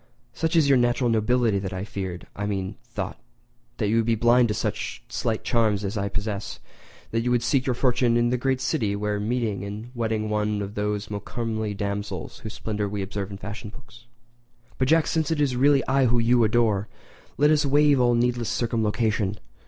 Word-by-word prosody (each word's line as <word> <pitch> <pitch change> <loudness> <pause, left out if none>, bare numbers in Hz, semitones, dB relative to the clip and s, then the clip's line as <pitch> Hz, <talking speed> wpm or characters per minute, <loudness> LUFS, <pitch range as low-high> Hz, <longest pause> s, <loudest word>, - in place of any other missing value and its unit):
Such 165 +1 -1
is 160 -4 +5
your 135 -2 +5
natural 120 0 +2
nobility 115 -1 +2
that 95 -1 -4
I - - -4
had - - -17
feared—I 95 +1 -5
mean 95 -1 -2
thought—you - - -5
would 115 - +2
be 115 - +3
blind 120 +2 +4
to 105 - -1
such - - -3
slight 110 -1 -2
charms 110 -4 +1
as 100 - -3
I 100 -1 -1
possess, 100 0 -3
and - - -30 0.5
that - - -4
you 125 - 0
would 120 -1 +2
seek 135 -1 +1
your 125 - +1
fortune 125 -2 +2
in 120 0 +2
the 125 - +2
great 130 0 0
city; 110 -10 0
there 105 0 -1
meeting 110 -2 -1
and 105 +4 -7
wedding 110 -3 -1
one 105 -1 0
of 100 +1 -6
those 105 0 -2
more 100 -1 -3
comely 110 -1 -3
damsels 100 -3 -4
whose 110 - -7
splendour 105 -2 -3
we 100 -1 -3
observe 100 0 -4
in 100 - -7
fashion 105 +2 -7
books. 120 0 -15 0.7
"But, 130 - +2
Jack, 160 +2 +4
since 160 -2 0
it 160 -2 0
is 140 -4 +1
really 140 +2 +4
I 135 0 +3
whom 120 0 +2
you 120 +1 +4
adore, 110 -2 +2 0.5
let 150 +1 +4
us 150 0 +3
waive 145 0 +4
all 120 -1 +4
needless 120 -1 +1
circumlocution. 110 -3 0
110 Hz, 200 wpm, -25 LUFS, 105-125 Hz, 0.7 s, is